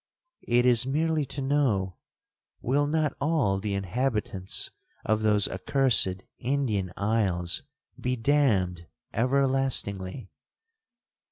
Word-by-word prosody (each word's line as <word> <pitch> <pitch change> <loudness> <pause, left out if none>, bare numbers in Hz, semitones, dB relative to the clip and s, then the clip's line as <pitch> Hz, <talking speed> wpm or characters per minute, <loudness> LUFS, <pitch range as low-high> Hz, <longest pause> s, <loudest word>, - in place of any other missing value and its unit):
'It 120 +1 +3
is 120 -1 +4
merely 155 +3 0
to 135 +1 -3
know, 120 -10 +1 0.6
will 145 +4 +1
not 155 -1 0
all 140 -11 +1
the 100 0 -2
inhabitants 100 -1 -2 0.3
of 110 +1 +1
those 105 -2 +3
accursed 110 -9 +1 0.2
Indian 115 -8 -1
isles 100 -5 +1 0.4
be 125 0 -1
damned 110 - +1 0.3
everlastingly?' 125 -6 0
120 Hz, 95 wpm, -27 LUFS, 100-135 Hz, 0.6 s, is